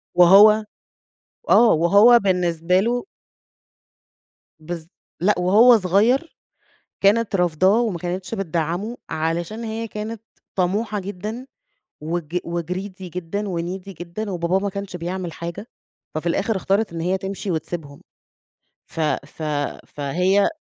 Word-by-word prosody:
وهو 200 +5 +7 0.9
آه، 235 -1 +6
وهو 200 +9 +6
بالنسبة 180 -3 +1
له 240 +4 -1 1.6
بالض 160 0 -7 0.3
لأ، 205 +4 +3
وهو 220 +7 +6
صغير 220 - +1 0.6
كانت 210 +1 +3
رافضاه 180 +5 +3
وما 220 -7 -1
كانتش 180 +4 -4
بتدّعمه، 175 +3 -2
علشان 165 +7 -2
هي 225 +1 -4
كانت 215 +1 -6 0.3
طموحة 205 +3 0
جدًا 210 +6 -6 0.6
وج 165 +1 -3
وgreedy 180 +3 -5
جدًا 180 +3 -4
وneedy 185 0 -4
جدًا، 175 +5 -5
وباباه 175 +1 0
ما 200 +1 -2
كانش 200 -1 -6
بيعمل 175 0 -4
حاجة، 170 +6 -7 0.5
ففي 155 +2 -2
الآخر 200 +6 0
اختارت 195 +1 0
إن 165 - -4
هي 180 +3 0
تمشي 195 +1 -4
وتسيبهم. 155 -3 -5 0.8
ف - - -10 0.3
ف 155 +2 -10 0.4
فهي 180 +8 +1
185 Hz, 115 wpm, -22 LUFS, 170-210 Hz, 1.6 s, وهو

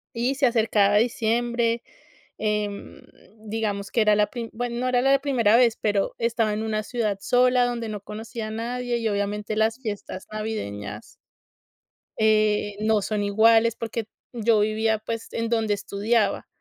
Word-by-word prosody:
Y 245 +4 0
se 275 0 +2
acercaba 220 -4 +3
diciembre, 235 +1 +1 0.5
em, 210 -1 -3 0.4
digamos 210 -2 -3
que - - 0
era 210 -1 +4
la 210 0 +3
pri 235 -2 -6
bueno, 240 +1 -3
no 255 - -1
era 250 -1 +2
la 270 +1 +4
primera 240 -6 +3
vez, 240 -2 +4
pero 205 -2 0
estaba 230 -2 +1
en 215 +1 -2
una 215 -1 -1
ciudad 215 -4 -2
sola 250 0 +3
donde 235 -2 -3
no 210 -1 -4
conocía 220 +2 -6
a - - -6
nadie, 240 +2 -2
y 225 -1 -1
obviamente 205 +1 -2
las 220 +1 +2
fiestas 205 -5 -6
navideñas 105 - -5 1.0
eh, 215 -1 +2
no 215 0 +2
son 210 +1 -2
iguales, 225 +2 +4
porque 230 -1 -4 0.3
yo 230 -2 +2
vivía, 215 +1 +1
pues, 225 +1 -5
en 230 0 -2
donde 225 -2 +1
estudiaba. 205 +2 0
220 Hz, 155 wpm, -24 LUFS, 210-235 Hz, 1.0 s, era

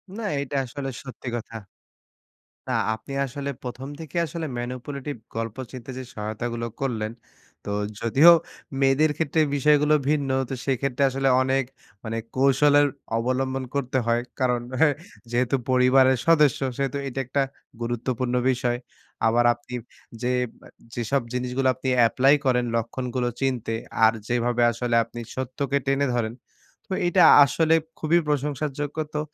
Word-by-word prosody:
না, 230 - -5 0.2
এইটা 140 0 -4
আসলে 135 +2 -5
সত্যি 130 -1 -10
কথা। 115 -1 -7 1.1
না - - -1 0.2
আপনি 110 +5 -10
আসলে 140 +1 -4
১ম 130 +2 -6
থেকেই 160 +1 -3
আসলে 165 +1 -5
ম্যানিপুলেটিভ 130 +3 -5 0.2
গল্প 115 -1 -3
চিনতে 130 0 -8
যে 130 - -6
সহায়তাগুলো 115 +2 -4
করলেন। 115 -5 -2 0.5
তো - - -5 0.3
যদিও 135 +9 +7 0.5
মেয়েদের 135 +3 +4
ক্ষেত্রে 160 0 0 0.2
বিষয়গুলো 150 +1 +4
ভিন্ন, 145 -2 +1 0.2
তো - - -3
সেইক্ষেত্রে 135 0 -1
আসলে 135 +1 0
অনেক 135 +1 +1 0.4
মানে 115 0 -3 0.2
কৌশলের 145 +2 +5 0.3
অবলম্বন 130 +2 -1
করতে 130 -2 0
হয়। 120 0 +2 0.2
কারণ 125 -2 +2 0.2
হে 160 - +7 0.4
যেহেতু 120 +2 +1
পরিবারের 130 +1 +5
সদস্য 150 -5 +5 0.2
সেহেতু 140 0 -1
এইটা 135 0 -3
একটা 140 +3 +1 0.4
গুরুত্বপূর্ণ 120 +1 -2 0.2
বিষয়। 120 -1 0 0.5
আবার 120 +2 +3
আপনি 120 +1 -12 0.5
যে 125 - 0 0.4
আপ - - -16 0.2
যেসব 120 +3 0
জিনিসগুলো 125 +1 0
আপনি 130 +1 -5 0.2
এপ্লাই 135 +4 +4
করেন 125 -2 +2
লক্ষণগুলো 125 +2 -2
চিনতে 125 -4 -1 0.3
আর 110 - +6 0.2
যেভাবে 120 0 +1
আসলে 120 +1 -2
আপনি 115 +1 -9
সত্যকে 130 +2 -1
টেনে 135 +1 +2
ধরেন। 115 -1 -1 0.6
তো - - 0
এইটা 175 +1 +4 0.2
আসলে 160 +4 +2 0.2
খুবই 165 +2 +3
প্রশংসার 150 0 -1
যোগ্য। 145 0 -4 0.2
তো 150 - 0
130 Hz, 135 wpm, -24 LUFS, 120-140 Hz, 1.1 s, যদিও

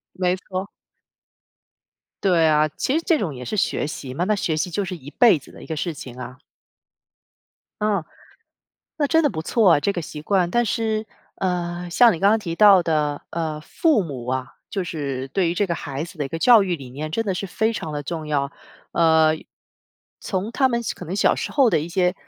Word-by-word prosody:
没 180 0 +1
错。 190 +1 -5 1.6
对 175 -4 +4
啊， 155 0 +4
其 - - -1
实 - - -1
这 330 - +4
种 175 -7 -2
也 125 -2 -8
是 215 - -3
学 190 - 0
习 135 -4 -6
嘛， 170 +7 -1
那 210 +3 +2
学 165 -5 -1
习 170 +4 -1
就 195 +4 -1
是 185 -1 -5
一 140 -4 -13
辈 225 -1 +5
子 - - -17
的 - - -13
一 - - -10
个 160 - -4
事 165 +2 -2
情 125 -3 -10
啊。 125 +1 -8 1.4
哦， 210 -5 +1 0.9
那 290 -2 +1
真 325 +2 +3
的 290 - +3
不 160 - -4
错 205 +1 +4
啊， 145 - +4
这 200 - +1
个 175 - -3
习 150 -1 -8
惯。 180 0 +1
但 240 +5 +2
是， 220 0 -1 0.3
呃， 175 -1 -2
像 235 +4 +6
你 165 - -5
刚 200 +1 +5
刚 220 - +4
提 170 -6 -4
到 200 -1 +7
的， 150 -3 0
呃， 160 -2 -3
父 270 - +1
母 130 -7 -7
啊， 130 -1 -3 0.2
就 195 -3 -2
是 140 -6 -4
对 175 +5 +1
于 - - -2
这 205 +3 +1
个 170 - -1
孩 145 -1 -4
子 175 +2 -12
的 150 - -2
一 - - -5
个 165 - -4
教 230 +3 +7
育 180 -3 -1
理 130 -4 -10
念 150 +4 -5
真 225 +8 -1
的 195 -3 -1
是 195 - -3
非 220 +4 0
常 160 -8 -5
地 145 0 -3
重 160 0 -5
要。 140 -2 -1 0.4
呃， 160 -1 +4 0.8
从 200 +2 -3
他 265 +2 +3
们 235 -1 0
可 - - -9
能 180 +3 -4
小 - - +3
时 - - -4
候 270 -5 +4
的 155 - +2
一 160 - -5
些， 180 +1 +1
175 Hz, 235 characters per minute, -22 LUFS, 155-205 Hz, 1.6 s, 到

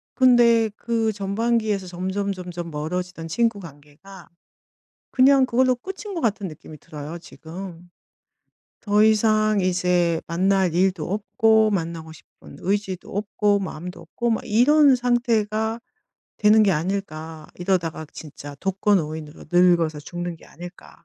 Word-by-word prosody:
근데 235 -3 +5
그 225 -2 -1
전반기에서 205 0 -1
점점점점 180 -1 -4
멀어지던 165 +2 -4
친구 225 +4 0
관계가 165 +4 -14 0.8
그냥 265 0 +5
그걸로 255 +1 +2
끝인 385 - -8
것 335 - -3
같은 210 -4 -1
느낌이 155 0 -12
들어요, 150 +4 -8
지금. 175 +1 -10 0.9
'더 210 0 +3
이상 215 -1 +3
이제 180 -2 +1
만날 185 0 +1
일도 180 -2 0
없고 220 +1 +2
만나고 165 -4 -3
싶은 - - -16
의지도 195 -1 -3
없고 205 0 +1
마음도 180 -1 -7
없고 235 -1 -3
막 225 - 0
이런 275 +5 +5
상태가 230 -3 0 0.6
되는 215 +1 +5
게 200 -3 +3
아닐까. 160 -2 -4
이러다가 175 -4 -2
진짜 145 -1 -10
독거노인으로 165 -6 -1
늙어서 170 -4 +3
죽는 175 +2 -6
게 - - -18
아닐까.' 175 +2 -13
195 Hz, 280 characters per minute, -23 LUFS, 170-220 Hz, 0.9 s, 근데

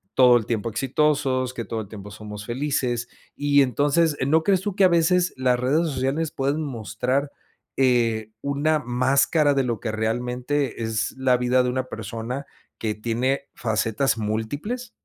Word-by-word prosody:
todo 125 -2 +7
el 110 - -3
tiempo 115 -1 -1
exitosos, 130 0 0
que 120 - -4
todo 115 0 -4
el 100 - -9
tiempo 105 -1 -9
somos 105 0 -8
felices. 125 -1 -1 0.3
Y 145 0 +3
entonces, 145 +5 +2
¿no 160 +3 +4
crees 190 -2 +2
tú 200 -1 -3
que 200 - +3
a 185 - +8
veces 175 +1 +3
las 125 -1 +2
redes 150 +7 +2
sociales 140 +4 -1
pueden 140 +3 -1
mostrar, 125 +3 -2 0.5
eh, 115 -4 +2
una 145 +2 +1
máscara 140 +4 +2
de 135 -1 +2
lo 120 -3 -2
que 115 - -3
realmente 125 +4 -2
es 110 -1 -1
la 130 -1 +3
vida 125 +1 +2
de 125 - 0
una 130 +1 -1
persona 125 +3 -5 0.3
que 110 -2 -2
tiene 120 +5 -1
facetas 115 +3 0
múltiples? 145 - -3
130 Hz, 160 wpm, -24 LUFS, 115-145 Hz, 0.5 s, a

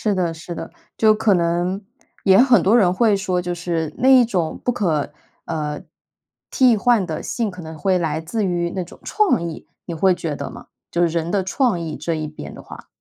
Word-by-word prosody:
是 210 -2 +1
的， 180 -3 0
是 165 +2 -8
的， - - -7 0.3
就 215 -1 +5
可 215 -1 +2
能 175 +3 0 0.4
也 190 -1 +5
很 245 -7 +5
多 220 +6 +4
人 180 -4 +3
会 215 0 +3
说， 185 -2 -1
就 180 - -3
是 170 -3 -3
那 260 - +2
一 260 -2 +7
种 175 -8 -2
不 - - +2
可， 165 -11 -1 0.3
呃， 150 -2 -3 0.7
替 255 -4 +4
换 225 -2 +3
的 160 -3 -4
性 230 -4 -2
可 180 -1 -10
能 160 0 -8
会 185 +3 +1
来 160 -2 -1
自 190 +7 -2
于 175 -2 -1
那 185 - -2
种 170 - -15
创 410 - +1
意， 160 - -10 0.2
你 170 - -4
会 185 +3 +3
觉 160 -4 -4
得 140 - -5
吗？ - - -12 0.2
就 175 - 0
是 170 - +4
人 165 +1 -2
的 195 -2 +1
创 195 -1 0
意 160 -2 -5
这 165 +2 -2
一 155 -1 -3
边 150 - -9
的 - - -11
话。 - - -12
180 Hz, 235 characters per minute, -21 LUFS, 165-210 Hz, 0.7 s, 一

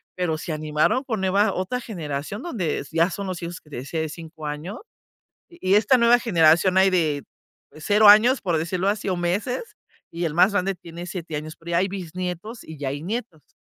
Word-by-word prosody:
pero 170 -4 -1
se 165 - -6
animaron 155 - +1
con 220 -6 -2
nueva 195 +2 +2
otra 185 +7 -2
generación 160 -2 -5
donde 195 - -2
s 140 - -9
ya 165 +3 +4
son 200 +3 -5
los 185 -2 -4
hijos 170 0 -6
que 150 - -22
te - - -7
decía 145 +6 -3
de 160 - -3
5 160 -1 -10
año. 155 - -6 0.7
Y 345 0 -17
y - - +7
esta 220 +5 +5
nueva 235 +1 +5
generación 175 -4 +4
hay 190 0 +5
de 155 -6 +1 0.5
0 205 +7 +4
años, 235 +6 +7
por 175 -4 0
decirlo 185 +4 -1
así, 205 -1 -1
o 185 - 0
meses 205 - -2 0.3
y 170 +1 -4
el 155 -2 -2
más 185 +4 +5
grande 195 -1 0
tiene 170 0 -9
7 170 -4 -5
años, 155 +1 -6
pero 170 +1 -10
ya 170 - +3
hay 190 +2 +1
bisnietos 185 +3 -6
y 160 -1 -10
ya 140 -1 -3
hay 145 +2 -4
nietos. 180 - -6
180 Hz, 210 wpm, -23 LUFS, 160-205 Hz, 0.7 s, y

